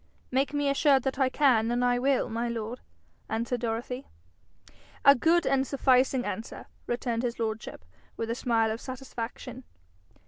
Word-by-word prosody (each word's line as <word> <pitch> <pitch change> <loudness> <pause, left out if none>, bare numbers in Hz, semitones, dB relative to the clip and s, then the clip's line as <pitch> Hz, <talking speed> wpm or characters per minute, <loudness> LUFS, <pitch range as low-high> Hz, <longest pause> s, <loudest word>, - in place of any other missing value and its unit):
'Make 270 +2 +1
me 290 -1 0
assured 275 -1 +3
that 265 0 -2
I 265 -1 +3
can, 250 -6 +3
and 245 +1 +1
I 245 0 +2
will, 270 +1 +2
my 230 +2 -2
lord,' 230 +1 -4 0.5
answered 235 +2 -1
Dorothy. 240 +3 -4 1.0
'A 280 - +10
good 330 +6 +2
and 270 0 +2
sufficing 260 -1 +2
answer,' 225 - -5 0.2
returned 240 -1 -1
his 245 -1 -2
lordship, 225 -1 -4 0.3
with 225 0 -2
a - - +1
smile 230 -2 +1
of 225 - -5
satisfaction. 255 -1 -7
245 Hz, 150 wpm, -28 LUFS, 230-270 Hz, 1.0 s, A